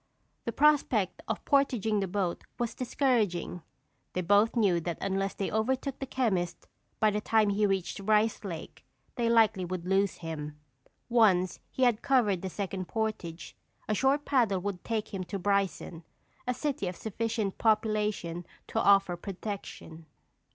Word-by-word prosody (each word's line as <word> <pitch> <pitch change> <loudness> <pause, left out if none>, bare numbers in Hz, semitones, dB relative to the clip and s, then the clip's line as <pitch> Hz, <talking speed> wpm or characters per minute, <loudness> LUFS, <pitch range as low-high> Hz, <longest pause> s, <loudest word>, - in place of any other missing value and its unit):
The 235 - -1
prospect 260 -9 +2
of 220 - -3
portaging 245 -7 +2
the 195 - -1
boat 185 -2 -2
was 240 -1 -2
discouraging. 225 -10 0 0.5
They 180 - -1
both 205 +6 +3
knew 200 -7 +3
that 170 0 -3
unless 195 0 -1
they 195 - -2
overtook 260 +5 -1
the 270 - -4
chemist 195 -10 -1 0.3
by 215 -1 +4
the 210 +1 -1
time 215 -1 +3
he 205 +1 +2
reached 195 -2 -1
Rice 215 +2 +2
Lake, 170 -5 -7 0.3
they 235 -2 0
likely 220 -5 +4
would 180 -1 -4
lose 195 +1 +2
him. 150 -2 -5 0.5
Once 190 -7 +3
he 260 - -1
had 240 -3 +3
covered 215 -9 +2
the 190 - -3
second 190 -1 -4
portage, 215 -7 -4 0.3
a 215 - +1
short 270 +6 +2
paddle 225 -9 +2
would 200 -2 -4
take 220 -2 -3
him 190 -1 -2
to 200 - -4
Bryson, 195 -3 -1 0.4
a 250 - +2
city 275 -10 -2
of 180 - -4
sufficient 220 -1 -3
population 210 -6 +1 0.3
to - - 0
offer 195 -3 +4
protection. 175 -4 -7
205 Hz, 150 wpm, -29 LUFS, 185-225 Hz, 0.5 s, by